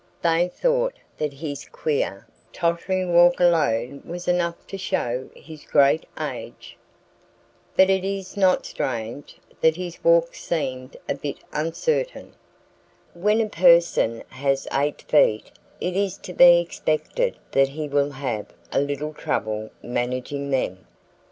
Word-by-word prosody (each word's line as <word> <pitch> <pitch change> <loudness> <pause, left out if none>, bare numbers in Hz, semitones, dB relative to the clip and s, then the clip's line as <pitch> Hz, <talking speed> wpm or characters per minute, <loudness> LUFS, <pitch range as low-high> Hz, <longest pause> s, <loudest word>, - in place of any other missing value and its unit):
They 170 +1 +3
thought - - 0 0.2
that 150 -1 -1
his 145 0 -6
queer, 125 -8 -2 0.3
tottering 175 +1 -1
walk 175 +1 +6
alone 140 -7 +2
was 175 +1 -7
enough 175 -1 0
to 195 - -7
show 125 -8 -2
his 155 -2 -12
great 140 +2 +3
age. - - -6 1.0
But 190 0 +6
it 190 -1 +1
is 195 0 -4
not 190 -2 +3
strange 120 +2 -4 0.2
that 160 0 +4
his 175 -1 -7
walk - - +4
seemed 135 - -4
a - - 0
bit 140 0 -5 0.2
uncertain. 475 - -2 0.8
When 210 +6 +2
a 220 - 0
person 170 - +4
has 135 +1 -1
eight 145 +2 0
feet 110 -8 +3 0.3
it 180 0 -2
is 195 -1 0
to 180 - -7
be 175 0 +8
expected 175 - -1
that 135 0 +3
he 150 +2 -5
will 145 0 +1
have 130 -6 -4 0.2
a - - +2
little 145 +2 -3
trouble 110 -6 -2
managing 125 +3 -3
them. 95 -9 -2
160 Hz, 130 wpm, -23 LUFS, 135-180 Hz, 1.0 s, be